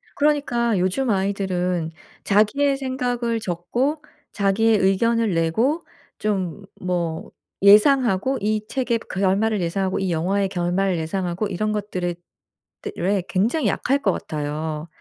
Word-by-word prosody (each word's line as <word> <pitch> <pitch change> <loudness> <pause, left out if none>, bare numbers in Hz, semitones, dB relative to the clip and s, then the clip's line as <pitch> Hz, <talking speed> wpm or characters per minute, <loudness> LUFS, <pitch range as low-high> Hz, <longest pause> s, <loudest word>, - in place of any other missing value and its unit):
그러니까 245 -7 +1
요즘 195 +8 0
아이들은 185 -4 -1 0.3
자기의 270 +8 +2
생각을 245 -3 -1
적고 245 - -2 0.3
자기의 210 +2 +2
의견을 225 +3 +2
내고 220 - +1 0.4
좀 200 -3 -2 0.2
뭐 175 -3 -2 0.3
예상하고 235 +3 +5
이 215 +1 0
책의 245 -3 -1
결말을 200 +2 +1
예상하고 185 +2 -1
이 190 -2 -1
영화의 190 +5 +1
결말을 180 +1 0
예상하고 180 +4 -2
이런 215 +2 -2
것들에 190 -4 -2 0.7
대 420 - -5
에 190 0 +1
굉장히 225 - +1
약할 275 +7 +1
것 - - +2
같아요. 150 +1 -4
200 Hz, 275 characters per minute, -22 LUFS, 180-235 Hz, 0.7 s, 예상하고